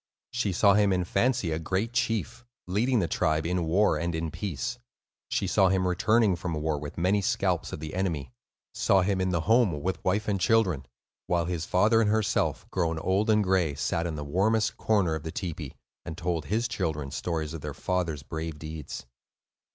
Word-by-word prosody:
She 120 Hz, -5 st, 0 dB
saw 100 Hz, +3 st, +5 dB
him 105 Hz, 0 st, +4 dB
in 90 Hz, -1 st, +1 dB
fancy 100 Hz, 0 st, +1 dB
a 80 Hz, -, -1 dB
great 95 Hz, +8 st, -2 dB
chief, 120 Hz, 0 st, -1 dB, 0.2 s
leading 115 Hz, +8 st, +1 dB
the 90 Hz, -6 st, +1 dB
tribe 80 Hz, 0 st, 0 dB
in 90 Hz, 0 st, 0 dB
war 90 Hz, -1 st, +3 dB
and 85 Hz, +1 st, -2 dB
in 80 Hz, -1 st, -2 dB
peace; 105 Hz, +9 st, -4 dB, 0.5 s
she -, -, 0 dB
saw 95 Hz, -1 st, +3 dB
him 95 Hz, 0 st, +1 dB
returning 105 Hz, +3 st, +3 dB
from 85 Hz, -1 st, -4 dB
war 75 Hz, -1 st, -1 dB
with 75 Hz, 0 st, -8 dB
many 95 Hz, +4 st, +2 dB
scalps -, -, 0 dB
of -, -, -5 dB
the 75 Hz, 0 st, -6 dB
enemy; 85 Hz, -9 st, -2 dB, 0.4 s
saw 95 Hz, -2 st, +3 dB
him 95 Hz, 0 st, 0 dB
in 95 Hz, -, +1 dB
the 85 Hz, -3 st, 0 dB
home 110 Hz, -5 st, +3 dB
with 95 Hz, +1 st, -2 dB
wife 100 Hz, +3 st, 0 dB
and 100 Hz, -3 st, 0 dB
children, 90 Hz, -, +2 dB, 0.4 s
while 85 Hz, -1 st, +1 dB
his 85 Hz, -2 st, -3 dB
father 110 Hz, +5 st, +4 dB
and 105 Hz, -, +2 dB
herself, 110 Hz, 0 st, +1 dB
grown 80 Hz, -3 st, 0 dB
old 95 Hz, +6 st, +1 dB
and 105 Hz, -1 st, +4 dB
gray, 90 Hz, -6 st, +1 dB
sat 85 Hz, +4 st, -1 dB
in 80 Hz, -, -4 dB
the 75 Hz, -, -4 dB
warmest 110 Hz, +8 st, +1 dB
corner 100 Hz, -7 st, +1 dB
of 80 Hz, -, -3 dB
the 80 Hz, +1 st, -5 dB
tepee 85 Hz, -4 st, -5 dB, 0.3 s
and 80 Hz, -, -7 dB
told 85 Hz, -3 st, -2 dB
his 115 Hz, +6 st, 0 dB
children 80 Hz, -11 st, -3 dB
stories 80 Hz, -2 st, -3 dB
of 80 Hz, -, -6 dB
their 75 Hz, -1 st, -5 dB
father's 85 Hz, -4 st, -2 dB
brave 80 Hz, 0 st, -5 dB
deeds. 75 Hz, -3 st, -7 dB
90 Hz, 195 wpm, -28 LUFS, 80-105 Hz, 0.5 s, saw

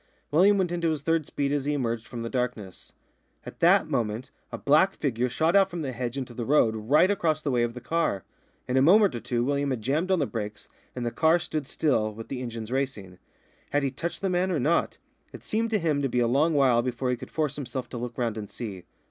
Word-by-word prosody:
William 190 Hz, +7 st, +5 dB
went 185 Hz, -3 st, 0 dB
into 170 Hz, -1 st, 0 dB
his 155 Hz, -3 st, -2 dB
third 165 Hz, -2 st, +1 dB
speed 140 Hz, -1 st, -2 dB
as 145 Hz, -2 st, -1 dB
he 150 Hz, -, 0 dB
emerged 115 Hz, -4 st, -2 dB
from 120 Hz, -2 st, -6 dB
the -, -, -3 dB
darkness. 125 Hz, -7 st, -4 dB, 0.5 s
At -, -, -10 dB
that -, -, +5 dB
moment 115 Hz, +1 st, -2 dB, 0.2 s
a -, -, -4 dB
black 155 Hz, +7 st, +3 dB
figure 125 Hz, -3 st, -1 dB
shot 160 Hz, +8 st, +1 dB
out 195 Hz, -1 st, +5 dB
from 170 Hz, -3 st, -5 dB
the 135 Hz, -, -3 dB
hedge 120 Hz, +1 st, -4 dB
into 130 Hz, -3 st, -5 dB
the 120 Hz, -, -4 dB
road 115 Hz, -4 st, +3 dB
right 150 Hz, -, +3 dB
across 160 Hz, -6 st, 0 dB
the 145 Hz, -, 0 dB
way 120 Hz, -2 st, +2 dB
of 120 Hz, 0 st, -1 dB
the 125 Hz, -, -7 dB
car. 160 Hz, -, -1 dB, 0.4 s
In 125 Hz, -, 0 dB
a -, -, +5 dB
moment 195 Hz, +7 st, +5 dB
or 120 Hz, -, -3 dB
two 120 Hz, 0 st, -1 dB
William 140 Hz, +1 st, 0 dB
had 125 Hz, -5 st, -3 dB
jammed 150 Hz, -, 0 dB
on 190 Hz, -, +3 dB
the 150 Hz, -, +1 dB
brakes, 105 Hz, -4 st, -6 dB, 0.3 s
and 125 Hz, -1 st, -3 dB
the 120 Hz, -, -1 dB
car 160 Hz, +5 st, +3 dB
stood 155 Hz, -4 st, -4 dB
still, 115 Hz, -10 st, +1 dB
with 115 Hz, +1 st, -9 dB
the 130 Hz, -2 st, -4 dB
engines 115 Hz, -2 st, -6 dB
racing. 125 Hz, -9 st, -3 dB, 0.5 s
Had 145 Hz, 0 st, +1 dB
he 135 Hz, -, 0 dB
touched 170 Hz, +5 st, -5 dB
the 195 Hz, -, +1 dB
man 180 Hz, +1 st, +1 dB
or 165 Hz, -, 0 dB
not? 155 Hz, +7 st, +1 dB, 0.4 s
It -, -, -10 dB
seemed 225 Hz, +2 st, -1 dB
to 220 Hz, -, +2 dB
him 155 Hz, -6 st, 0 dB
to 135 Hz, -, 0 dB
be 125 Hz, -, 0 dB
a 120 Hz, -, +3 dB
long 150 Hz, +6 st, +2 dB
while 130 Hz, -4 st, +4 dB
before 125 Hz, +1 st, -2 dB
he -, -, +1 dB
could -, -, -10 dB
force 150 Hz, -3 st, -1 dB
himself 130 Hz, -2 st, -5 dB
to 125 Hz, -, -6 dB
look 120 Hz, 0 st, -6 dB
round 115 Hz, -3 st, -1 dB
and 105 Hz, -, -7 dB
see. 95 Hz, -7 st, -7 dB
135 Hz, 250 wpm, -27 LUFS, 120-160 Hz, 0.5 s, William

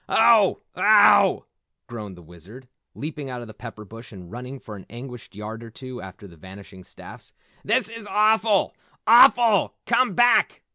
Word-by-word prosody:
"Oh! -, -, +3 dB
Oh!" -, -, +4 dB, 0.4 s
groaned 105 Hz, -5 st, -9 dB
the 90 Hz, -, -15 dB
Wizard, 90 Hz, +10 st, -15 dB, 0.3 s
leaping 150 Hz, -2 st, -7 dB
out 125 Hz, -1 st, -7 dB
of 120 Hz, -, -10 dB
the 110 Hz, -, -12 dB
pepper 110 Hz, 0 st, -11 dB
bush 115 Hz, +4 st, -13 dB
and 90 Hz, -4 st, -13 dB
running 125 Hz, +3 st, -8 dB
for 105 Hz, -, -11 dB
an 95 Hz, -, -13 dB
anguished 125 Hz, -2 st, -11 dB
yard 110 Hz, +2 st, -8 dB
or 115 Hz, -, -11 dB
two 130 Hz, +2 st, -10 dB
after 95 Hz, +1 st, -12 dB
the 85 Hz, -3 st, -17 dB
vanishing 95 Hz, +2 st, -14 dB
staffs. 95 Hz, -, -13 dB, 0.3 s
"This 235 Hz, +4 st, 0 dB
is 225 Hz, -2 st, -10 dB
awful, 215 Hz, -1 st, +1 dB, 0.3 s
AWFUL! 235 Hz, -3 st, +5 dB
Come 240 Hz, -4 st, +1 dB
back! 240 Hz, 0 st, +2 dB
120 Hz, 160 wpm, -22 LUFS, -, 0.4 s, AWFUL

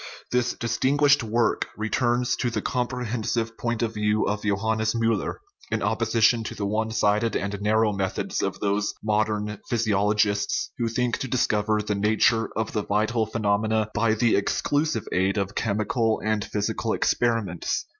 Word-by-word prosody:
This 125 Hz, 0 st, +1 dB
distin 130 Hz, +4 st, 0 dB
guished 145 Hz, -1 st, +5 dB
work 115 Hz, 0 st, 0 dB
returns 120 Hz, +3 st, +1 dB
to 120 Hz, -, 0 dB
the 120 Hz, -, -2 dB
comprehensive 120 Hz, -2 st, -2 dB
point 120 Hz, -1 st, -2 dB
of 115 Hz, -1 st, -1 dB
view 105 Hz, 0 st, +1 dB
of 105 Hz, 0 st, -1 dB
Johannes 110 Hz, +2 st, 0 dB
Miiller, 115 Hz, -3 st, 0 dB, 0.3 s
in 115 Hz, -2 st, -1 dB
opposition 115 Hz, +1 st, +2 dB
to -, -, -5 dB
the 100 Hz, -, -3 dB
one 110 Hz, +2 st, -1 dB
sided 110 Hz, +1 st, +1 dB
and 100 Hz, 0 st, -2 dB
narrow 110 Hz, +1 st, +2 dB
methods 95 Hz, -1 st, -2 dB
of -, -, -2 dB
those 100 Hz, +1 st, 0 dB
modern 105 Hz, -1 st, 0 dB
physiolo 105 Hz, -3 st, +1 dB
gists 100 Hz, -1 st, +1 dB
who 120 Hz, -, +1 dB
think 120 Hz, +1 st, -1 dB
to 135 Hz, -, -3 dB
discover 110 Hz, -4 st, +1 dB
the 105 Hz, -, -1 dB
nature 110 Hz, +2 st, +2 dB
of 110 Hz, -1 st, -1 dB
the 105 Hz, -, -1 dB
vital 110 Hz, +2 st, 0 dB
phe 110 Hz, -, -5 dB
nomena 110 Hz, +1 st, +1 dB
by 110 Hz, 0 st, +2 dB
the 115 Hz, 0 st, +3 dB
exclusive 145 Hz, +4 st, 0 dB
aid 95 Hz, +2 st, +1 dB
of 100 Hz, 0 st, -1 dB
chemical 110 Hz, +2 st, 0 dB
and 110 Hz, -2 st, 0 dB
physical 105 Hz, -1 st, -2 dB
experiments. 115 Hz, -8 st, 0 dB
110 Hz, 160 wpm, -25 LUFS, 105-115 Hz, 0.3 s, guished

